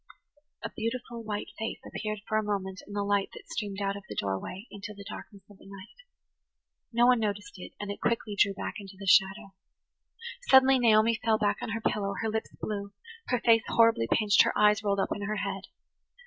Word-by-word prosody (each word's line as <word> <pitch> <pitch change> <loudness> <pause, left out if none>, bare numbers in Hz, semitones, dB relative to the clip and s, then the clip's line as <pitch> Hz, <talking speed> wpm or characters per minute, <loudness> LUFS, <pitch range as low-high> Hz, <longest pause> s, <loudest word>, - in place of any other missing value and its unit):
A - - -4
beautiful, 235 +1 -4
white 210 -1 -4
face 220 +1 -3
appeared 215 -1 -4
for 215 -1 +1
a - - -2
moment 195 -2 -3
in 205 - -9
the 205 0 -1
light 200 -1 +1
that - - -12
streamed 205 -3 -4
out 195 0 -1
of 200 - -7
the - - -6
doorway 100 - -3
into 205 +1 -8
the 200 0 -11
darkness 200 -2 -10
of 205 -2 -17
the - - -16
night. 195 - -12 0.9
No 235 +1 +4
one 250 -1 +5
noticed 205 -2 -3
it, - - -9
and 205 -1 -4
it 200 - -8
quickly 225 -3 -1
drew 200 0 +3
back 205 - -5
into 195 -1 -11
the 195 - -8
shadow. 195 +1 +3 1.0
Suddenly 265 0 +7
Naomi 225 -1 +4
fell 220 -1 +3
back 205 -1 +1
on - - -4
her 225 +1 -3
pillow, 200 -2 -1
her 225 - 0
lips 220 +1 -2
blue, 200 -1 -4 0.3
her 250 - +1
face 225 -1 +5
horribly 230 - +4
pinched, 210 -2 +5
her - - +1
eyes 210 +1 +4
rolled 200 -1 +1
up - - 0
in 205 - -7
her 210 +1 -2
head. 195 -1 -4
205 Hz, 205 wpm, -29 LUFS, 200-220 Hz, 1.0 s, Suddenly